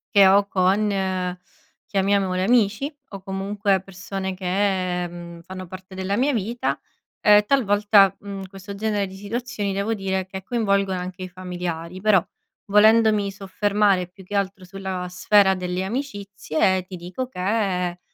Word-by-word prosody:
che 200 -1 +8
ho 200 +1 +5
con, 195 +2 +2 1.0
chiamiamole 195 -2 +1
amici 230 +5 +2 0.2
o 195 -2 -8
comunque 195 0 -1
persone 190 0 -5
che, 185 -1 0
mhmm, 170 0 -10
fanno 185 +1 -8
parte 185 +1 -10
della 190 +2 -1
mia 280 +3 +2
vita 230 +2 -1 0.4
e 210 0 +6
talvolta, 205 -5 +4
mhmm, 200 -1 -7
questo 195 +1 -9
genere 205 -1 0
di 190 - -11
situazioni 205 0 -3
devo 200 +3 -1
dire 190 -2 -2
che 190 0 -8
coinvolgono 200 -4 +1
anche 185 +1 -6
i - - -4
familiari. 180 -1 -5
Però 200 -4 +4 0.4
volendomi 215 0 +5
soffermare 200 -1 +1
più 190 +2 -16
che 200 +3 -6
altro 195 -1 -1
sulla 190 -1 -5
sfera 190 +2 +4
delle 180 0 -3
amicizie, 195 - -1
ti 185 0 -9
dico 180 +9 -5
che, 185 -4 -1
195 Hz, 140 wpm, -23 LUFS, 185-205 Hz, 1.0 s, che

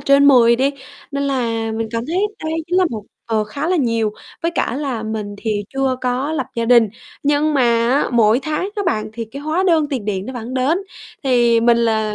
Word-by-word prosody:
trên 280 +1 +4
10 235 -3 +6
đi. 270 +3 +2 0.4
Nên 280 -1 -2
là 230 -5 -1
mình 225 0 -3
cảm 230 0 -2
thấy 335 - -2 0.3
đây 315 - -2
chính 360 +2 +1
là 370 - +4
một 220 -3 -5 0.3
ờ, 220 -2 +1
khá 280 +9 -4
là 365 - +2
nhiều. 230 -7 +1 0.3
Với 335 - +1
cả 245 - 0
là 270 -6 -3
mình 215 -2 -4
thì 210 -2 -2
chưa 270 -1 +1
có 255 +4 -1
lập 275 -5 -2
gia 230 - -1
đình. 235 -2 +5 0.3
Nhưng 295 +1 +2
mà 275 - +3 0.3
á, 270 +4 +2
mỗi 230 0 +4
tháng 310 +4 -2
á 410 - 0
bạn 215 -4 -1
thì 230 +1 -5
cái 260 +6 -9
hóa 315 +5 0
đơn 325 -4 +3
tiền 255 -7 -2
điện 200 -2 -2
nó 260 - -5
vẫn 245 0 -6
đến. 270 +7 +2 0.5
Thì 240 -3 +3
mình 235 0 +4
là 220 -2 +1
245 Hz, 220 wpm, -19 LUFS, 225-280 Hz, 0.5 s, 10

